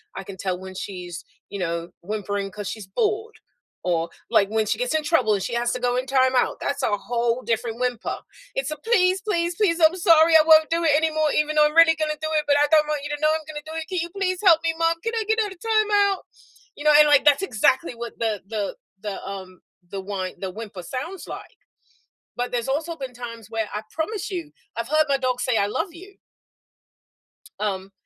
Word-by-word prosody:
I 195 - -5
can 190 0 -9
tell 185 -1 -2
when 190 0 -9
she's, 180 -3 -6 0.3
you 200 - -6
know, 170 -1 -3
whimpering 200 +1 -3
'cause 205 0 -6
she's 210 -4 -7
bored 435 - -1 0.5
or, 170 -2 0 0.2
like, 200 0 +4
when 220 0 +1
she - - 0
gets - - 0
in 310 - +1
trouble 295 -8 +2
and 190 - -3
she 235 - -4
has 240 0 0
to 250 - -3
go 245 0 0
in 255 +1 -2
time 260 -1 +3
out, 250 - +2
that's 285 0 -2
a 205 -4 +1
whole 235 +2 -1
different 230 +1 -2
whimper, 250 -2 -2 0.4
it's 270 +2 -2
a 305 - -4
"Please, 375 0 +2
please, 345 -5 -1
please. 345 -5 +1
I'm 320 +2 +5
sorry. 330 -2 +5
I 315 - +9
won't 315 -1 +6
do 335 0 +1
it 305 -3 +4
anymore 310 -1 +2
even 300 0 +1
though 300 - +6
I'm 300 - -6
really 330 0 +7
gonna 305 -1 -2
do 315 - -2
it, 305 -1 +1
but 285 0 +4
I 290 - +5
don't 305 -1 +5
want 300 -2 -2
you 290 - -5
to 295 - -12
know 310 0 +4
I'm 315 0 -3
gonna 300 -1 -6
do 315 - -8
it. 325 0 -4
Can 370 -2 -2
you 340 - -4
please 370 -2 -1
help 335 -4 +6
me, 330 0 +1
mom? 330 0 +1
Can 455 - -2
I 445 - 0
get 440 +1 +1
out 415 - -4
of 350 - -23
time 435 -2 +1
out?" 400 -2 +2 0.5
You 295 - -9
know? 300 - +6
And, 300 0 +7
like, 290 -2 +5
that's 295 +5 +5
exactly 255 - +1
what 235 0 -7
the 220 -3 -1
the 210 -2 -3 0.3
the, 205 -2 -5
um, 190 -2 -8 0.3
the 195 +1 -5
whine 190 -1 -5
the 190 - -4
whimper 205 -2 -8
sounds 305 - -6
like. - - -9 0.8
But 245 0 -3
there's 240 +1 -2
also 315 +5 -1
been 265 -4 -7
times 230 -3 -9
where, 225 -2 -2
I 210 - -3
promise 400 +6 -3
you, 340 -5 -5 0.2
I've 230 +1 -3
heard 310 +1 +3
my 280 - +3
dog 255 -1 -1
say, 250 -2 +1
"I 200 - +2
love 330 - -2
you." 380 +3 -13 1.4
Um. 195 -2 -2
280 Hz, 235 wpm, -23 LUFS, 215-330 Hz, 1.4 s, I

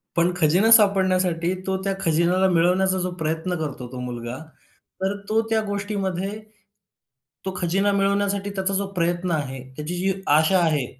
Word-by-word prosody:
पण 170 +1 +3
खजिना 180 +7 +3
सापडण्यासाठी 185 -5 +4
तो 190 0 0
त्या 195 0 0
खजिन्याला 170 +3 +2
मिळवण्याचा 185 +2 +2
जो 180 0 -2
प्रयत्न 160 +2 -2
करतो 140 -5 -5
तो 130 - -7
मुलगा. 120 0 -5 0.6
तर 190 +1 0
तो 220 +1 +3
त्या 220 -1 +2
गोष्टीमध्ये, 200 -2 -2 1.2
तो 190 - -3
खजिना 190 +4 +1
मिळवण्यासाठी 200 0 0
त्याचा 190 0 -1
जो 195 0 -1
प्रयत्न 175 0 -1
आहे, 140 -4 -2 0.2
त्याची 150 +4 -5
जी 190 +2 +1 0.2
आशा 185 +4 +3
आहे, 155 -6 +1
185 Hz, 145 wpm, -23 LUFS, 165-195 Hz, 1.2 s, सापडण्यासाठी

